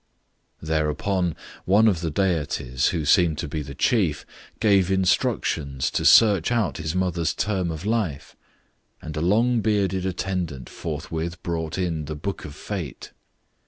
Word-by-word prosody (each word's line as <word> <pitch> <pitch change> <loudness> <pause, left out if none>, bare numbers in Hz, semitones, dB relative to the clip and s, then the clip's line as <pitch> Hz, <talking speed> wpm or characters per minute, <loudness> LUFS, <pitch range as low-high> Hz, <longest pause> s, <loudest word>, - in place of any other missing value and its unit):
Thereupon 80 +3 0 0.3
one 105 +4 +5
of 90 -7 +2
the 85 - -1
deities, 75 -7 0
who 80 -4 -1
seemed 80 0 +4
to - - -3
be 75 +1 -3
the 70 -1 -8
chief, 90 - +1 0.3
gave 100 -4 +3
instructions 80 -7 0
to - - -1
search 105 -4 +6
out 115 -7 0
his 80 0 -3
mother's 90 -4 0
term 95 -4 -1
of 80 +3 -5
life, 105 -10 -2 0.6
and 80 -1 -8
a 75 - -2
long 115 +7 +3
bearded 95 -3 0
attendant 90 -7 -3
forthwith 85 +1 -5
brought 80 -1 -3
in 85 -5 -2
the 75 +2 -5
Book 95 +7 -5
of 75 - -9
Fate. 90 -5 -6
85 Hz, 145 wpm, -24 LUFS, 80-95 Hz, 0.6 s, search